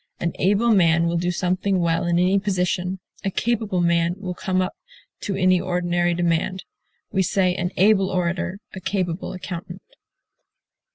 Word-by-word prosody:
An 170 - -1
able 205 +5 +3
man 170 -5 +4
will 170 0 0
do 175 +1 0
something 185 +2 0
well 165 0 +1
in 170 0 +2
any 185 +3 +3
position. 185 -1 -1 0.2
A 195 - 0
capable 215 -3 0
man 170 0 +2
will 185 -3 -5
come 185 +1 -1
up 185 0 -1 0.5
to 200 - -3
any 185 -1 +3
ordinary 175 -1 0
demand. 175 +2 0 0.5
We 190 - +1
say 185 0 +2
an 180 -1 -2
able 195 0 +4
orator, 185 +1 -1 0.2
a 190 - -6
capable 185 -3 -2
accountant. 180 0 -7
180 Hz, 155 wpm, -23 LUFS, 175-190 Hz, 0.5 s, man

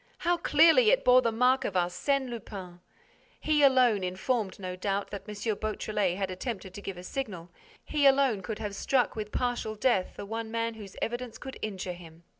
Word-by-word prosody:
How 350 0 +1
clearly 335 +8 +5
it - - +3
bore 250 0 +7
the 230 -2 +1
mark 250 +3 +3
of 195 - -3
Arsène 180 +10 0
Lupin! 195 -6 -8 0.6
He 305 -1 +2
alone, 255 -7 +5
informed, 190 +3 -1
no 185 -1 -5
doubt, 195 +2 -2
that 205 +1 -7
M. 210 - -6 0.2
Beautrelet 210 -3 -1
had 195 -1 -2
attempted 190 -1 -5
to 205 - -8
give 195 -2 -6
a 180 - -9
signal, 185 -7 -5 0.3
he 290 -2 +3
alone 270 -6 +3
could 210 +3 -5
have 210 -2 -4
struck 250 +5 +1
with 210 -1 -5
partial 245 -3 -2
death 210 -4 +1
the - - -6
one 225 +2 -4
man 230 0 -1
whose 205 -4 -11
evidence 240 0 -4
could 265 - -9
injure 190 -4 -4
him. 170 -1 -14
215 Hz, 190 wpm, -29 LUFS, 190-255 Hz, 0.6 s, bore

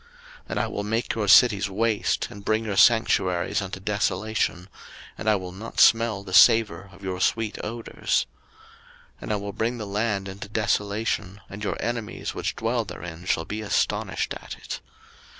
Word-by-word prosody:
03:026:031 470 - -26 0.4
And - - -1
I - - +1
will 105 - -4
make 115 +3 -1
your 110 -2 -2
cities 100 -1 +6
waste, 110 +2 0
and 100 - -10
bring 110 +2 0
your 100 -2 -2
sanctuaries 95 -7 +3
unto 95 -1 -6
desolation, 100 -2 -1 0.5
and 110 - -1
I 105 - +5
will 95 -2 -5
not 105 +5 -7
smell 115 -3 +5
the 95 -2 -9
savour 105 -5 +5
of 100 +1 -16
your 95 -1 -3
sweet 115 -2 0
odours. 115 0 -1 0.9
03:026:032 - - -27
And - - -5
I - - +2
will 100 0 -4
bring 115 +4 -1
the 110 - -5
land 100 -1 -1
into 95 +1 -8
desolation: 105 -2 -1
and 100 +3 -7
your - - -2
enemies 115 -2 -3
which - - -3
dwell - - 0
therein 85 +1 -8
shall 80 -3 0
be 105 +5 -4
astonished 105 - -1
at - - -8
it. - - -6
105 Hz, 175 wpm, -25 LUFS, 95-110 Hz, 0.9 s, cities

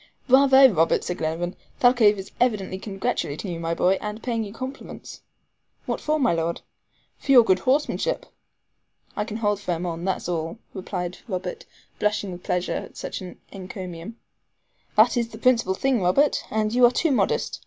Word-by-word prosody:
"Bravo! 270 +1 +7
Robert," 165 -8 +2
said 180 - -4
Glenarvan. 165 +3 -2 0.2
"Thalcave 245 -4 +5
is 195 0 -8
evidently 210 -6 0
congratulating 195 -3 -3
you, 165 - -5
my 165 0 -2
boy, 190 +3 +2
and 210 +1 -6
paying 230 -3 -1
you 205 - -7
compliments." 260 +5 -8 0.6
"What - - -3
for, 310 0 0
my 250 -9 +3
Lord?" 165 0 -2 0.6
"For 275 - -2
your 245 -3 +9
good 190 -4 +3
horsemanship." 295 - 0 0.9
"I 210 - -1
can 215 -1 -5
hold 205 -3 0
firm 180 -3 -3
on, 170 -1 -4
that's 190 -2 -2
all," 165 +2 -3 0.2
replied 180 -2 -5
Robert 230 - -5 0.3
blushing 210 -2 0
with 175 0 -8
pleasure 180 0 -1
at - - -6
such - - -5
an 180 -1 -9
encomium. 185 0 -8 0.8
"That 230 +3 +5
is 235 -1 +1
the 220 - -10
principal 230 -5 +2
thing, 260 0 +1
Robert; 185 +12 +2
but 215 0 -1
you 250 +1 +3
are - - +1
too 320 +5 +1
modest. 260 - 0
205 Hz, 170 wpm, -24 LUFS, 180-245 Hz, 0.9 s, your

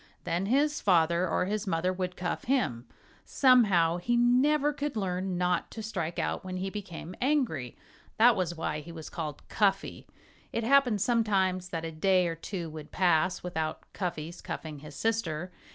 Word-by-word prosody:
Then 175 +3 -1
his 290 +6 +2
father 170 -1 +3
or 180 - +1
his 210 +2 -2
mother 180 +1 0
would 180 -1 -4
cuff 180 - -3
him. 130 - 0 0.4
Somehow, 200 - +4
he 240 +7 0
never 280 +5 +3
could 285 -3 -3
learn 185 -2 -2
not 180 0 0
to 220 - -7
strike 170 -6 -3
out - - -2
when 185 0 -5
he 190 +1 -3
became 185 -4 -7
angry. 255 - 0 0.4
That 235 +2 +6
was 175 -3 -1
why 155 -2 -2
he 165 +3 -10
was 160 -2 -9
called 155 -3 -6
Cuffy. 195 -2 0 0.4
It 230 - -2
happened 245 -4 +4
sometimes 190 -6 +1
that 165 -2 -4
a 165 - -4
day 180 +3 +2
or 165 - -1
two 170 +1 -5
would 155 -1 -9
pass 180 0 +2
without 160 -3 -3
Cuffy's 175 -2 -4
cuffing 155 -3 -6
his 150 0 -11
sister. 185 -6 -1
185 Hz, 170 wpm, -29 LUFS, 165-225 Hz, 0.4 s, That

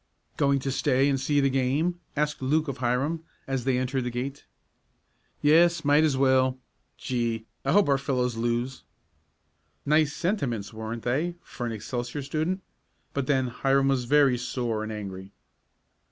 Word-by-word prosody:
"Going 140 -1 +3
to 135 - -2
stay 135 0 +2
and 135 -1 +1
see 145 +2 +1
the 135 - +3
game?" 140 +7 0 0.2
asked 150 0 -1
Luke 155 +4 +1
of 140 -2 -4
Hiram, 135 +7 0 0.2
as 135 -2 -2
they 130 -2 +2
entered 130 +1 -1
the 125 - -2
gate. 130 +4 -5 1.0
"Yes, 165 +2 +5
might 145 +2 +5
as 150 -4 +2
well. 130 -1 +3 0.4
Gee! 115 -3 -2 0.2
But 135 - -3
I - - +3
hope 205 0 +5
our 140 -1 +3
fellows 125 -3 0
lose!" 120 +3 -1 1.0
Nice 150 0 +3
sentiments, 140 - -2
weren't 110 +1 -5
they 155 +8 0
for 120 - -5
an - - -3
Excelsior 120 +5 -4
student? 160 +7 -2 0.5
But 140 -2 -2
then 130 -3 +2
Hiram 135 +2 +2
was 130 -3 +1
very 140 -2 +4
sore 120 -3 -2
and 110 0 -4
angry. 95 -2 -7
135 Hz, 160 wpm, -27 LUFS, 120-145 Hz, 1.0 s, Yes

